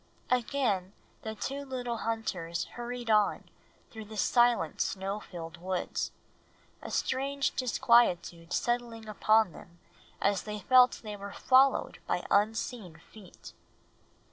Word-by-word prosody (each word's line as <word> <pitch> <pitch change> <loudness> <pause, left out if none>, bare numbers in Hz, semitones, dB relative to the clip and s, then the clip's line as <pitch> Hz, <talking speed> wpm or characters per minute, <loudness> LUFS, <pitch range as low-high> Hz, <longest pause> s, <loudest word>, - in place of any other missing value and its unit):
Again 230 -7 0 0.3
the 220 0 -5
two 275 +6 -4
little 250 -3 -4
hunters 185 -8 -3
hurried 240 -1 -4
on 210 -1 +3 0.5
through 220 -1 -8
the 215 +1 -10
silent, 240 -7 +2
snow 195 +2 -2
filled 165 -4 -9
woods, 185 +1 -2 0.7
a - - -7
strange 275 +1 0
disquietude 205 -9 +2
settling 240 -2 -1
upon 215 -1 +3
them 170 +2 -14 0.4
as 200 -1 +1
they 210 0 -5
felt 250 +4 +5
they 210 -1 -6
were 200 0 -8
followed 265 +1 +3
by - - -1
unseen 210 - 0 0.2
feet. 205 -5 -13
220 Hz, 115 wpm, -30 LUFS, 195-245 Hz, 0.7 s, felt